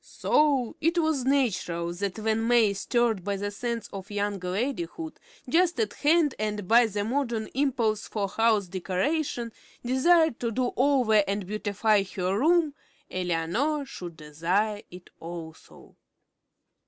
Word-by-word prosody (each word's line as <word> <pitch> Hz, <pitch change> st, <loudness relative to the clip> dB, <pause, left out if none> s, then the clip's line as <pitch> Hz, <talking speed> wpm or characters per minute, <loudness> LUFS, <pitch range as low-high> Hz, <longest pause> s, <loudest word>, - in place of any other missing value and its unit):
So 280 Hz, -6 st, +1 dB
it 330 Hz, +3 st, +1 dB
was 315 Hz, -6 st, +1 dB
natural 185 Hz, -11 st, 0 dB
that, 195 Hz, +2 st, -3 dB
when 220 Hz, +1 st, 0 dB
May, 235 Hz, -4 st, +4 dB
stirred 225 Hz, -1 st, 0 dB
by 200 Hz, +1 st, -1 dB
the 205 Hz, +1 st, -3 dB
sense 235 Hz, +2 st, -4 dB
of 195 Hz, -1 st, -7 dB
young 205 Hz, -1 st, -2 dB
ladyhood 275 Hz, -, -3 dB, 0.3 s
just 335 Hz, +1 st, +2 dB
at 215 Hz, -2 st, 0 dB
hand 305 Hz, -1 st, +3 dB
and 210 Hz, -2 st, -3 dB
by 235 Hz, +2 st, +6 dB
the 205 Hz, -1 st, -2 dB
modern 235 Hz, -1 st, -1 dB
impulse 240 Hz, -6 st, 0 dB
for 205 Hz, -2 st, -2 dB
house 220 Hz, 0 st, +2 dB
decoration, 230 Hz, -, -2 dB, 0.3 s
desired 315 Hz, +3 st, +3 dB
to 235 Hz, -, -1 dB
"do 245 Hz, +2 st, -1 dB
over" 250 Hz, -6 st, +3 dB
and 200 Hz, 0 st, -2 dB
beautify 210 Hz, +1 st, +1 dB
her 185 Hz, 0 st, 0 dB
room, 315 Hz, +5 st, +3 dB, 0.4 s
Eleanor 185 Hz, -, -1 dB
should 175 Hz, -10 st, -9 dB
desire 180 Hz, +8 st, -1 dB
it 180 Hz, 0 st, -13 dB
also. 165 Hz, -1 st, -10 dB
220 Hz, 135 wpm, -27 LUFS, 195-270 Hz, 0.4 s, by